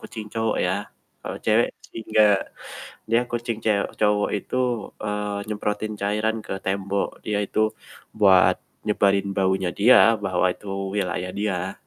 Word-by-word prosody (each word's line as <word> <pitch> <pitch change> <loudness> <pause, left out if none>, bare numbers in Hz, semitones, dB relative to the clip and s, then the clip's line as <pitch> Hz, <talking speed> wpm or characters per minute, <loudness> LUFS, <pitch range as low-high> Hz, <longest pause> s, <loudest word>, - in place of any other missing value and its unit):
kucing 110 -3 -8
cowok 110 -1 0
ya, - - +1 0.5
kalo - - -5
cewek 110 +2 +3 0.2
sih - - -7
nggak. 105 -2 +5 0.8
Dia 115 - +4
kucing 120 -1 -2
cew 105 -2 +2 0.2
cowok 105 -1 +2
itu, 100 - -6 0.5
eee, 105 -1 -2
nyemprotin 105 0 -2
cairan 105 +2 0
ke - - -4
tembok. 100 0 -1 0.2
Dia 105 -1 0
itu 110 - -3 0.6
buat 95 -3 +6 0.3
nyebarin 100 -1 +2
baunya 95 -1 +1
dia, 120 +5 +7 0.3
bahwa 95 -2 +1
itu 105 - -15 0.3
wilayah 90 -2 -2
dia. 95 -2 -2
105 Hz, 135 wpm, -24 LUFS, 100-110 Hz, 0.8 s, dia